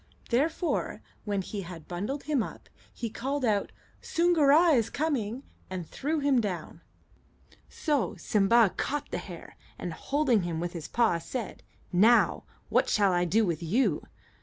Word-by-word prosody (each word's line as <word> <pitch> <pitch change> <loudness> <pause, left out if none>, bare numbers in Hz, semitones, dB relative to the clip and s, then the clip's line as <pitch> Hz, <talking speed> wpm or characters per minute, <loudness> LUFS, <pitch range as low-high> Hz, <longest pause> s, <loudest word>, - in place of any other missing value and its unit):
Therefore, 315 +7 0 0.2
when 200 -2 -1
he 205 +2 -5
had 170 -3 -9
bundled 210 +11 -4
him 295 -4 +1
up, - - -7 0.2
he 235 - -4
called 265 +5 -2
out, 205 -3 +1 0.3
"Soongoora 330 -1 +4
is 230 -5 +2
coming!" 265 -5 -2 0.3
and 185 -2 -4
threw 305 +4 -2
him 280 -4 +3
down. 180 -7 -5 0.9
So 295 -6 -1
Simba 210 0 +3
caught 290 +1 -2
the - - -2
hare, - - -10 0.2
and, - - -5
holding 275 -7 +1
him 170 -2 -3
with 175 +1 -3
his 165 -3 -6
paw, 225 -8 +2
said, 230 +6 -6 0.3
"Now, 220 +7 +4 0.2
what - - +2
shall 200 -2 +3
I 175 0 +2
do 215 +5 +3
with 170 -3 -2
you?" 190 - +1
230 Hz, 150 wpm, -28 LUFS, 185-280 Hz, 0.9 s, Soongoora